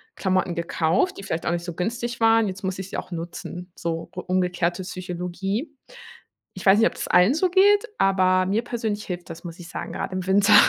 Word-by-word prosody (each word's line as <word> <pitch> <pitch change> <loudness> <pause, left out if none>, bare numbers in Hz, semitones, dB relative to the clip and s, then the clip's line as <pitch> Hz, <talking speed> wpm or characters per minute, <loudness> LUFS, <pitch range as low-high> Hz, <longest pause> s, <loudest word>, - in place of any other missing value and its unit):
Klamotten 185 -2 +1
gekauft, 170 - +1
die 195 - -8
vielleicht 165 -3 -3
auch - - +1
nicht 170 0 -1
so 175 -1 -5
günstig 235 +6 -3
waren, 225 -1 +5
jetzt 190 +1 -8
muss 190 0 -2
ich 190 0 -6
sie - - -4
auch - - -6
nutzen“, 175 +1 -6
so 165 0 -3
u - - -4
umgekehrte 180 0 0
Psychologie. 185 - -4 0.8
Ich 185 - -9
weiß 195 +2 +7
nicht, 225 - +6
ob - - -5
das - - -4
allen 180 +9 +5
so 365 +3 +2
geht, 405 +5 +5
aber 185 -1 +3
mir 210 +4 +1
persönlich 220 -4 -3
hilft 175 -1 -6
das, 165 0 -8
muss 170 -1 -8
ich 170 0 -10
sagen, - - -6
grad - - -4
im 185 -1 -3
Winter. 200 +2 +5
185 Hz, 215 wpm, -24 LUFS, 175-215 Hz, 0.8 s, weiß